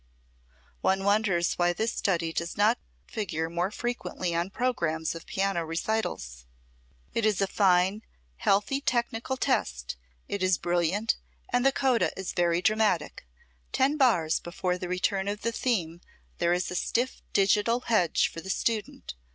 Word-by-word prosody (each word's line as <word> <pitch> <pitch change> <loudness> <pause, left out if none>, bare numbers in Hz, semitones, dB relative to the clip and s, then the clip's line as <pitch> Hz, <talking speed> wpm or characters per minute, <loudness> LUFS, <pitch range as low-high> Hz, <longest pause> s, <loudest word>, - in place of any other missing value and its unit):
One 195 0 +2
wonders 200 -4 +2
why 175 0 +3
this 220 +6 -1
study 170 -5 0
does 170 +1 -3
not 215 +4 +4 0.3
figure 165 -7 -3
more 175 +2 0
frequently 215 -6 -3
on 170 +2 0
programmes 170 -10 -1
of 165 - -10
piano 195 -3 0
recitals. 160 - -3 0.7
It 230 - 0
is 215 -3 +2
a 195 - +3
fine, 190 +1 +3 0.4
healthy 205 - +1
technical 240 0 -1
test, - - -1 0.3
it 200 - -3
is 185 -2 +3
brilliant, 175 +5 +1 0.3
and 245 0 +2
the 270 - +5
coda 265 -3 +2
is 190 -1 -4
very 175 0 +1
dramatic. 210 - +1 0.4
Ten 275 +3 +2
bars 225 - +3
before 180 +1 -2
the 180 - -5
return 190 +2 0
of 205 +1 -3
the 230 - +1
theme 175 -9 -1 0.4
there 170 - +2
is 180 +1 0
a - - -4
stiff 245 +7 -1
digital 210 +4 +3
hedge 215 -9 +2
for 165 - -8
the 190 - -9
student. 220 +2 -2
190 Hz, 150 wpm, -28 LUFS, 170-220 Hz, 0.7 s, the